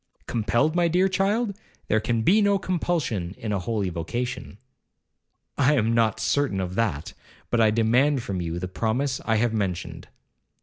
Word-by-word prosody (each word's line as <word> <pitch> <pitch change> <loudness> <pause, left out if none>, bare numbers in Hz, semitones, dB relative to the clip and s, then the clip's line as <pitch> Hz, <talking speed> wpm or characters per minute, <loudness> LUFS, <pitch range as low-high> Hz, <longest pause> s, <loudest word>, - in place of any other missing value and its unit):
'Compelled, 120 +7 0
my 175 -1 +3
dear 180 +3 +3
child! 200 +3 0 0.3
there 110 - +2
can 115 0 -1
be 205 - +4
no 200 -1 +3
compulsion 160 - -2
in 110 - -4
a 100 - 0
holy 100 -1 -2
vocation.' 120 +6 -4 1.0
'I 140 +2 +4
am 115 -3 +1
not 115 -2 +2
certain 140 -9 0
of 90 -1 -3
that; 95 -8 -2 0.4
but 120 - +3
I 110 - +5
demand 120 +5 +2
from 95 -5 -3
you 85 0 -3
the 90 +1 -3
promise 120 +8 -1
I 110 - +2
have 115 +1 +1
mentioned.' 95 -5 -3
115 Hz, 165 wpm, -25 LUFS, 100-150 Hz, 1.0 s, I